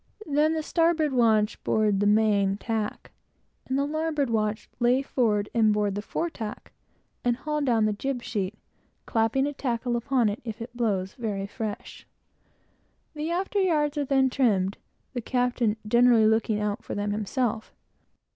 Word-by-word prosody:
Then 300 +2 +2
the 315 - -2
starboard 325 -3 +2
watch 220 -3 +2
board 210 -2 +2
the 205 - +2
main 205 -2 +3
tack, 220 -1 -3 0.6
and 260 - 0
the 280 - +1
larboard 305 -3 -1
watch 215 -1 -1
lay 250 +2 +3
forward 215 -7 +1
and 220 -2 +4
board 210 -1 +1
the 205 - -3
fore 330 +10 -3
tack 220 -6 -7 0.5
and 245 -1 +2
haul 300 +1 -2
down 235 -6 +2
the 215 - +1
jib 250 +3 -3
sheet, 210 -4 -3 0.5
clapping 230 +4 +1
a 290 - -2
tackle 245 -3 -2
upon 240 0 +1
it, 205 +1 -3
if 225 -3 -6
it 235 +1 -8
blows 200 -6 -1
very 210 -6 -3
fresh. 215 0 -6 1.1
The 305 +1 -4
after 380 +3 0
yards 305 -5 +1
are 295 - 0
then 265 -1 +2
trimmed, 205 -8 +1 0.3
the 245 - -3
captain 245 -3 0
generally 235 0 +5
looking 220 -1 +2
out 210 0 -2
for - - -5
them 205 0 -1
himself. 220 +2 -2
235 Hz, 160 wpm, -26 LUFS, 210-275 Hz, 1.1 s, generally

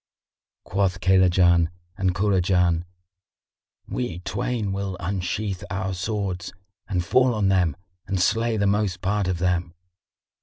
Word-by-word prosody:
Quoth 95 -2 0
Kaylajan 90 -2 +4 0.3
and 95 -2 0
Kurajan, 90 -4 +2 1.0
"We 120 -9 -3
twain 105 +3 -2
will 95 -1 -3
unsheath 95 +2 -2
our 95 -1 -2
swords 95 -1 -3 0.3
and 90 -3 -1
fall 125 +5 +3
on 100 -2 +2
them 90 -6 +2 0.3
and 95 - -1
slay 115 +5 +2
the 100 - +1
most 100 -2 +1
part 100 0 0
of 95 -1 0
them." 90 -1 -1
95 Hz, 120 wpm, -24 LUFS, 90-100 Hz, 1.0 s, Kaylajan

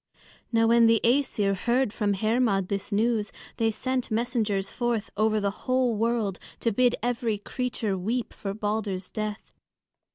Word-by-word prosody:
Now 225 -1 +3
when 230 0 +5
the 225 -1 +5
Æsir 230 -6 +2
heard 240 +3 +1
from 205 -2 0
Hermod 215 -2 +1
this 200 +2 -3
news, 215 0 +1 0.3
they 225 -1 +2
sent 255 +3 -2
messengers 220 -4 0
forth 240 -3 -1
over 215 +1 +2
the 200 -1 0 0.2
whole 255 -2 +3
world 220 -3 0 0.2
to 230 - +2
bid 245 +3 +3
every 235 -3 0
creature 220 -1 -2
weep 225 +7 -2
for 195 -1 -5
Balder's 205 -3 -2
death. 215 -1 -5
220 Hz, 150 wpm, -27 LUFS, 205-240 Hz, 0.3 s, when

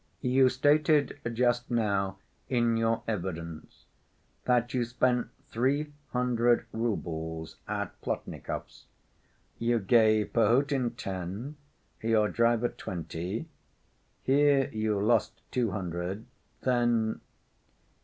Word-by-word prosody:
"You 130 0 +4
stated 145 +3 +3
just 120 +1 +1
now 100 -5 0 0.3
in 120 -2 +2
your 115 0 +1
evidence 85 -6 -5 0.6
that 120 -1 +2
you 125 -2 +2
spent 125 +1 +1 0.2
three 140 +5 0 0.2
hundred 120 -1 +2
roubles 80 -8 -3
at - - -4
Plotnikovs'. - - -5 0.7
You 120 +1 +2
gave 110 -1 +3
Perhotin 125 +3 +2
ten, 95 - -5 0.5
your 110 -2 +3
driver 115 0 +2
twenty, 90 - -5 0.8
here 140 0 +4
you 110 -2 0
lost 110 +2 +2
two 120 -3 +1
hundred, 90 +1 -4 0.4
then...." 120 -3 +1
115 Hz, 95 wpm, -29 LUFS, 100-125 Hz, 0.8 s, You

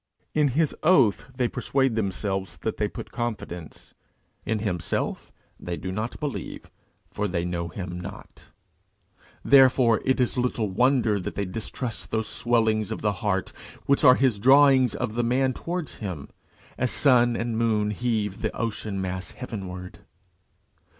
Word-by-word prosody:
In 150 -1 +3
his 150 +3 +1
oath 145 - +4
they 125 -1 +1
persuade 135 +1 0
themselves 95 -2 -2
that - - -2
they - - +1
put - - -8
confidence: 100 -8 -6 0.5
in 110 - +1
himself 90 -6 -3 0.3
they 85 -1 -4
do 95 - -5
not 110 +5 -4
believe, 145 -3 -5 0.4
for 105 - -2
they 85 -2 -2
know 85 -1 -2
him 90 +1 -6
not. 95 +3 -10 1.0
Therefore 130 -4 +5
it 130 0 +1
is 125 0 +1
little 120 -4 -1
wonder 120 -1 +2
that 90 - -5
they 100 - -1
distrust 110 +4 -5
those 110 0 -1
swellings 110 -3 +1
of 110 - -4
the 105 -1 +2
heart 100 -4 -1 0.3
which 140 +2 +2
are 130 -3 +8
his 130 -7 +2
drawings 135 0 +5
of 110 - -3
the 120 +1 0
man 130 +2 +1
towards 175 +1 -5
him, 90 -10 -6 0.5
as 130 - +1
sun 120 -4 +4
and 115 0 -2
moon 110 -2 +1
heave 105 -3 -2
the - - -2
ocean 105 -3 -3
mass 95 -2 -3
heavenward. 95 -7 -7
110 Hz, 150 wpm, -25 LUFS, 95-125 Hz, 1.0 s, are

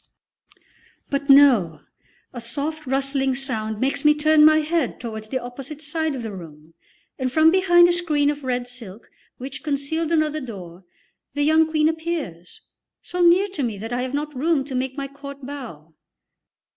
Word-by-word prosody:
But 280 0 -2
no! 255 - +5 0.5
A 240 - -6
soft, 290 +6 -4
rustling 270 0 0
sound 220 -5 -2
makes 265 +3 -1
me 300 0 +5
turn 305 0 +4
my 310 0 +7
head 315 -3 -1
towards 220 -3 -7
the 260 - -1
opposite 260 +4 -8
side 315 0 -2
of 250 - -6
the 220 - -5
room, 160 -4 -12 0.5
and 255 -1 -1
from 315 +3 +5
behind 350 -2 +5
a - - +2
screen 305 -5 +1
of 295 -1 -8
red 250 -1 -2
silk 235 -4 -11 0.3
which 265 +2 -7
concealed 305 +2 -2
another 310 -1 +1
door 185 -7 -9 0.5
the 290 - +1
young 315 +1 +4
Queen 310 -1 +2
appears, 320 - -4 0.4
so 360 - -4
near 350 +3 +5
to 370 -6 -5
me 230 -5 -2
that 225 +4 -6
I 245 - -1
have 260 +2 -3
not 295 0 -4
room 300 +1 +1
to 270 0 -8
make 260 +1 -3
my 275 -1 -3
court 280 0 -10
bow. 225 - -9
275 Hz, 170 wpm, -22 LUFS, 245-310 Hz, 0.5 s, my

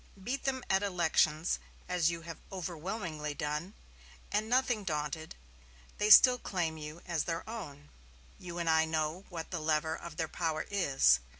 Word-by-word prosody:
Beat 245 +8 -3
them 260 -2 0
at 190 0 +3
elections, 170 -4 +2 0.3
as 175 -3 +2
you 170 -1 -4
have 165 -1 -8
overwhelmingly 170 -4 -4
done, 150 +5 -3 0.6
and, 215 +2 0
nothing 245 -3 +2
daunted, 155 -2 -3 0.6
they 210 - +2
still 250 +3 +9
claim 170 -7 -2
you 155 +1 -8
as 170 -4 -1
their 165 +3 -3
own. 150 -11 -8 0.5
You 175 -1 -7
and 170 -1 -2
I 160 0 +4
know 160 +3 -2
what 165 -2 -6
the 170 - -2
lever 155 0 +1
of 170 -2 -9
their 160 - 0
power 160 -1 -2
is. 135 - +4
170 Hz, 160 wpm, -32 LUFS, 155-190 Hz, 0.6 s, still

